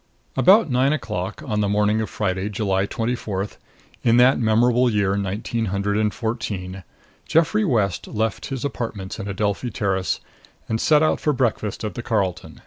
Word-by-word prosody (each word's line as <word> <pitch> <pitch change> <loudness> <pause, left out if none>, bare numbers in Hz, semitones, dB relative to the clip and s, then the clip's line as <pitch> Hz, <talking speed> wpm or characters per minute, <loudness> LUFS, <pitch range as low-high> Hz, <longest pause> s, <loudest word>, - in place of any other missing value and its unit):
About 180 - +5
nine 130 +3 +3
o'clock 105 -10 -4
on 105 -1 -1
the 105 -1 +1
morning 105 +1 +2
of 110 - -3
Friday, 95 -1 -2
July 100 -2 0
twenty 115 +2 -1
fourth, 100 -4 -4 0.4
in 115 0 +4
that 125 +2 +5
memorable 120 +2 +3
year 100 -3 +1
nineteen 100 +4 -2
hundred 100 +1 -1
and 105 0 +1
fourteen, 95 -5 -4 0.4
Geoffrey 165 +7 +3
West 110 - 0
left 110 -1 -2
his 135 -1 -4
apartments 115 -8 -4
in 100 - -5
Adelphi 100 +4 -1
Terrace 95 -3 -1 0.5
and 110 0 -1
set 150 -1 +4
out 155 - +2
for 150 - +1
breakfast 115 -6 -1
at 105 - -3
the 120 - -5
Carlton. 100 -7 -2
110 Hz, 165 wpm, -22 LUFS, 100-125 Hz, 0.5 s, About